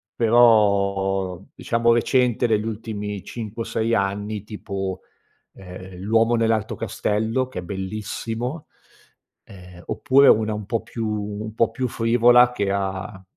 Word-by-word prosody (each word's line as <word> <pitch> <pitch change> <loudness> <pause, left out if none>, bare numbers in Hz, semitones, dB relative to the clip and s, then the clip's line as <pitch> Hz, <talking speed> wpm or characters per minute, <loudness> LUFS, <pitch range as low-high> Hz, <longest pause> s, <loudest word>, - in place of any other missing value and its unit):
però 100 -5 +3
diciamo 115 0 +1
recente 125 0 +2
degli 110 -1 +1
ultimi 105 -3 -5
5 115 0 -6
o - - -10
6 115 +1 0
anni. 100 +1 -2
Tipo: 95 -3 -5 0.6
ehm, 90 0 -11
L'Uomo 115 +4 +2
Nell'Alto 110 -1 0
Castello, 110 +3 -1
che 130 - -7
è - - -13
bellissimo 110 - -5 0.8
ehm, 90 -2 -14
oppure 135 +1 +4
una 110 0 +3
un 105 -1 -5
po' 115 +1 -1
più 115 -2 -5
un 105 +1 -4
po' 115 0 +2
più 130 -1 -2
frivola 120 +2 +4
che 100 -5 -1
ha 95 0 -4
110 Hz, 130 wpm, -22 LUFS, 100-115 Hz, 0.8 s, oppure